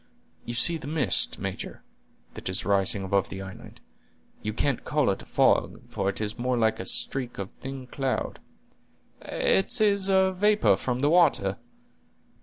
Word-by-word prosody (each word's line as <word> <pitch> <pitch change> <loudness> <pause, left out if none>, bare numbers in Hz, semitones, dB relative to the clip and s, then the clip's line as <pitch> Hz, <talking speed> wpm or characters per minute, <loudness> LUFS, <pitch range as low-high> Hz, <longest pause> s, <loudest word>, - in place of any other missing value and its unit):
You 120 - -5
see 165 +8 +5
the 140 - -9
mist, 145 - 0
major, - - -6 0.5
that - - -5
is 95 - -1
rising 100 0 +2
above 100 0 0
the 95 0 -6
island; 95 -1 -11 0.6
you 105 - -2
can't 125 +3 -1
call 150 -7 +1
it 95 - -4
a - - -13
fog, - - +2
for 95 0 -1
it 100 - -3
is 110 +2 -4
more 125 0 0
like 110 -1 +1
a 95 - -5
streak 130 -3 0
of 95 -1 -5
thin 135 -1 -7
cloud—" 135 0 -3 0.8
"It 195 +5 0
is 200 -2 +3
vapor 190 - +3
from 125 +4 -2
the 145 - +3
water." 145 - +3
125 Hz, 160 wpm, -26 LUFS, 100-160 Hz, 0.8 s, see